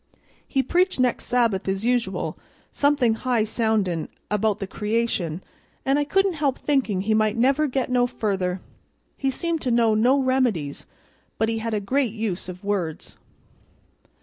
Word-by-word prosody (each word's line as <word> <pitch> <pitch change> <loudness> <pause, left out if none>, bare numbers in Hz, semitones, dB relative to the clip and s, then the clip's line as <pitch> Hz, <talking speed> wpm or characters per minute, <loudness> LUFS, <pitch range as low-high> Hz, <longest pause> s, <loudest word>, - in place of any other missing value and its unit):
He 270 - +1
preached 360 +3 +1
next 250 -1 +1
Sabbath 230 -6 +1
as 195 +3 -1
usual, 235 -7 0 0.4
somethin' 285 -5 +2
high 235 -1 0
soundin' 215 -7 0 0.2
about 210 0 +1
the 195 - -4
creation, 210 -5 -2 0.4
and 275 +2 +3
I 290 - +1
couldn't 390 +5 +2
help 275 -3 +1
thinkin' 260 -10 0
he 215 +3 +1
might 215 0 +2
never 275 +5 +3
get 260 -1 -2
no 245 -1 +3
further; 190 -6 -2 0.5
he 270 - -1
seemed 330 +4 -2
to 255 - -1
know 230 -2 +3
no 240 +6 +4
remedies, 255 - 0 0.5
but 220 - +1
he 225 0 -1
had 225 0 -2
a - - +1
great 245 +3 0
use 215 -5 -3
of 180 +1 -9
words." 190 -6 -3
230 Hz, 155 wpm, -24 LUFS, 200-260 Hz, 0.5 s, no